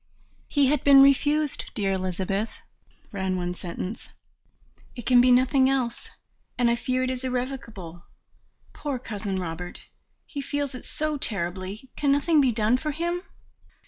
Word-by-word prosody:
"He 285 -2 +3
had 290 +3 +2
been 275 -1 +8
refused, 290 +2 +2
dear 200 -4 0
Elizabeth," 190 +3 -2 0.5
ran 190 -3 -1
one 180 0 -2
sentence, 180 +4 -6 0.9
"it 240 -3 -8
can 250 -1 +6
be 250 0 +5
nothing 260 +1 +4
else, 250 -3 -1 0.5
and 240 -1 +3
I - - +3
fear 255 +2 -1
it 255 - 0
is 255 0 -5
irrevocable. 240 -9 -5 0.7
Poor 285 -3 -3
Cousin 210 -5 -4
Robert! 175 0 -5 0.4
He 285 - -5
feels 285 0 -2
it 255 - -9
so 305 -1 -3
terribly. 195 +3 -3
Can 285 -1 +1
nothing 295 +2 +4
be 260 -3 +3
done 220 +2 +2
for 305 +3 -3
him? 340 +4 -2
250 Hz, 145 wpm, -26 LUFS, 195-275 Hz, 0.9 s, been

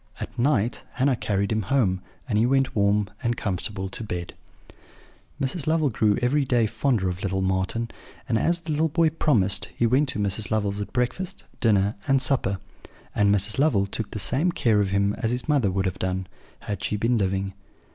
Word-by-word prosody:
At - - -6
night 120 -3 +1
Hannah 135 0 +2
carried 100 -3 -1
him 110 0 +1
home, 100 -5 +1 0.3
and 115 - -1
he 115 - +3
went 135 0 +1
warm 100 0 +2
and 120 -1 -1
comfortable 95 -1 -3
to 105 - -5
bed. 90 -5 -5 1.1
"Mrs. 140 +2 -2
Lovel 155 -3 +2
grew 105 -1 +2
every 140 +4 +2
day 120 -3 +2
fonder 110 -2 0
of 90 +1 -3
little 95 -1 -1
Marten; 95 +5 -1 0.4
and, 115 -4 +1
as 170 0 +1
the 160 - -5
little 155 +2 +1
boy 165 +1 +2
promised, 100 - +3
he 120 - +2
went 130 +5 +3
to - - -2
Mrs. 100 +1 0
Lovel's 105 -2 0
at 100 - -6
breakfast, 125 +9 -2 0.2
dinner, 105 -3 +3
and 135 0 +4
supper; 130 -7 +1 0.6
and 105 -1 +3
Mrs. 105 +4 +1
Lovel 140 -10 +3
took 100 +2 -4
the - - -6
same 140 - +1
care 110 -9 +2
of 100 - 0
him 100 +1 +1
as 110 - 0
his 125 +4 -3
mother 140 -9 +3
would 95 +1 -1
have 90 - -2
done, 95 0 -2 0.4
had 100 -3 -5
she 105 - -1
been 115 +2 +1
living. 95 0 -1
110 Hz, 195 wpm, -25 LUFS, 100-130 Hz, 1.1 s, and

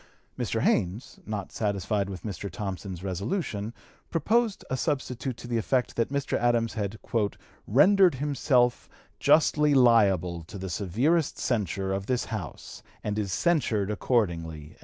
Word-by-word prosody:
Mr. - - -2
Haynes, 105 +10 0
not 105 -3 -4
satisfied 100 -1 -1
with 95 -2 -7
Mr. 100 -2 -5
Thompson's 95 -1 -5
resolution, 100 - -2 0.4
proposed 215 +6 +1
a 130 - -1
substitute 130 -2 -2
to - - -9
the 120 -1 0
effect 125 +3 0
that 115 - 0
Mr. 140 -1 -1
Adams 120 -2 +2
had 105 -1 -3 0.7
"rendered 180 - +5
himself 130 -3 +1 0.3
justly 150 -1 +4
liable 100 -9 +4
to 100 - -9
the 95 -1 -5
severest 120 - +1
censure 95 -4 -1
of 95 0 -3
this 125 -1 0
House 95 -9 -6 0.2
and 105 0 -2
is 100 -3 -2
censured 115 - +1
accordingly." 85 - -1
110 Hz, 135 wpm, -27 LUFS, 95-130 Hz, 0.7 s, rendered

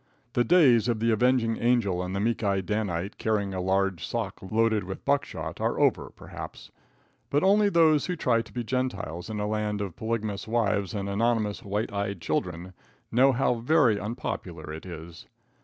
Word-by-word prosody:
The 120 - +3
days 130 - +5
of 115 -3 0
the 115 +1 +2
avenging 115 0 +2
angel 115 -7 +1
and 90 +1 -4
the - - -1
meek 115 +2 0
eyed 100 -2 0
Danite, 100 -3 -2
carrying 105 -3 0
a 95 - -2
large 95 -1 0
sock 110 -5 -4
loaded 110 +2 +1
with 95 +1 -7
buckshot, 140 0 -1
are - - 0
over, - - +2
perhaps; - - -10 0.6
but 145 - +1
only 205 +2 +5
those 160 -5 +4
who 180 - -1
try 120 -8 +2
to 110 -2 -13
be 120 +3 -3
Gentiles 110 -9 -3
in 110 -1 -4
a 105 - -1
land 105 -1 -1
of 100 -5 -4
polygamous 110 -3 -3
wives 105 -5 0
and 100 -1 -3
anonymous 105 0 0
white 105 +2 -3
eyed 100 -2 -2
children, 90 +2 -3 0.4
know 130 +4 +5
how 125 0 +2
very 125 -4 +3
unpopular 90 -7 -5
it 80 +4 -8
is. 80 -1 -9
105 Hz, 175 wpm, -27 LUFS, 95-120 Hz, 0.6 s, days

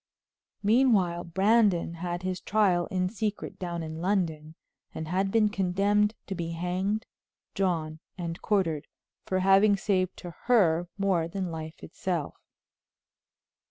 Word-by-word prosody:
Meanwhile 205 -6 +3
Brandon 190 -1 +2
had 175 +1 -4
his 185 0 -3
trial 190 -4 +2
in 185 -3 0
secret 210 +1 -4
down 170 -2 -3
in 160 0 -6
London, 165 -5 -1 0.4
and 160 - -4
had 190 +3 0
been 215 +1 +3
condemned 205 +2 +1
to 195 - -4
be 170 -2 -4
hanged, 185 +5 -1 0.5
drawn 160 -5 -1 0.2
and 170 -2 -5
quartered 165 -8 0 0.4
for 185 0 0
having 195 +2 +5
saved 185 -2 0
to 175 - -8
her 175 -8 +3
more 190 -5 +1
than 185 0 -4
life 160 0 -7
itself. 170 -2 -3
185 Hz, 125 wpm, -28 LUFS, 170-200 Hz, 0.5 s, having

